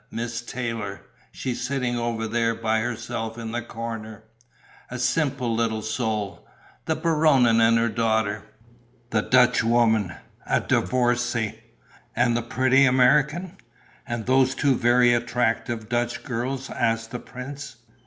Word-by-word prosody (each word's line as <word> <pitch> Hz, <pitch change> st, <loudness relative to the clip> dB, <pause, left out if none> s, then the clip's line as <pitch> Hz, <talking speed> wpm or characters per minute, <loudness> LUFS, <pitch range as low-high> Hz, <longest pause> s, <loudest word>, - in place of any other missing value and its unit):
"Miss 115 Hz, +1 st, -4 dB
Taylor: 115 Hz, -5 st, -5 dB, 0.3 s
she's 125 Hz, -2 st, -4 dB
sitting 125 Hz, -1 st, -1 dB
over 115 Hz, -1 st, -2 dB
there, 115 Hz, 0 st, 0 dB
by 110 Hz, -1 st, 0 dB
herself 115 Hz, -1 st, -4 dB
in 115 Hz, -1 st, -5 dB
the 120 Hz, +1 st, -2 dB
corner. 115 Hz, -2 st, -7 dB, 0.7 s
A 125 Hz, -, -5 dB
simple 130 Hz, -1 st, 0 dB
little 110 Hz, -1 st, -1 dB
soul.... 110 Hz, -3 st, -3 dB, 0.4 s
The 160 Hz, -, 0 dB
Baronin 150 Hz, -8 st, +3 dB
and 115 Hz, 0 st, +5 dB
her 115 Hz, +1 st, +2 dB
daughter.... 110 Hz, -2 st, 0 dB, 0.7 s
The 110 Hz, -, +2 dB
Dutchwoman: 115 Hz, -6 st, +3 dB, 0.3 s
a -, -, +2 dB
divorcée.... 120 Hz, -3 st, 0 dB, 0.6 s
And 120 Hz, -1 st, +2 dB
the 120 Hz, -, +1 dB
pretty 130 Hz, +3 st, +3 dB
American." 150 Hz, +8 st, +2 dB, 0.5 s
"And 120 Hz, -2 st, -4 dB
those 130 Hz, 0 st, +3 dB
two 140 Hz, -3 st, +2 dB
very 120 Hz, 0 st, +4 dB
attractive 120 Hz, -1 st, -1 dB
Dutch 120 Hz, +1 st, -1 dB
girls?" 130 Hz, +2 st, -4 dB
asked 115 Hz, -1 st, -1 dB
the 125 Hz, -, -4 dB
prince. 140 Hz, +4 st, -8 dB
120 Hz, 125 wpm, -24 LUFS, 115-125 Hz, 0.7 s, and